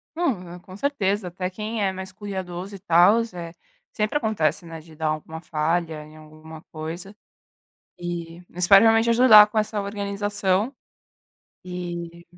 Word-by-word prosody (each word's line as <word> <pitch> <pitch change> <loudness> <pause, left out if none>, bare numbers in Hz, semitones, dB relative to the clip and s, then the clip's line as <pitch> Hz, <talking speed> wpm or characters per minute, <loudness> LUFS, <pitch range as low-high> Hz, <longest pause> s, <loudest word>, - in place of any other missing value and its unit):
Não, 190 - -2
com 185 +1 -12
certeza, 205 -7 -1
até 180 +1 -4
quem 215 +3 -4
é 195 - +1
mais 190 0 -8
cuidadoso 190 -1 -6
e 195 - -8
tals, 200 +5 +4
eh, 170 -2 -7 0.4
sempre 215 +6 -1
acontece, 205 - 0
né, 165 -1 -8
de 160 0 -16
dar 160 0 -2
alguma 155 +1 -4
falha 160 0 -2
em 155 +1 -16
alguma 155 +1 -13
coisa 165 +5 -7 0.8
e 175 0 -6
espero 180 +3 +6
realmente 225 +1 +4
ajudar 230 -3 +8
com 210 - -6
essa 215 0 0
organização. 200 +2 -1 0.9
E 175 -1 -6
185 Hz, 140 wpm, -24 LUFS, 170-210 Hz, 0.9 s, ajudar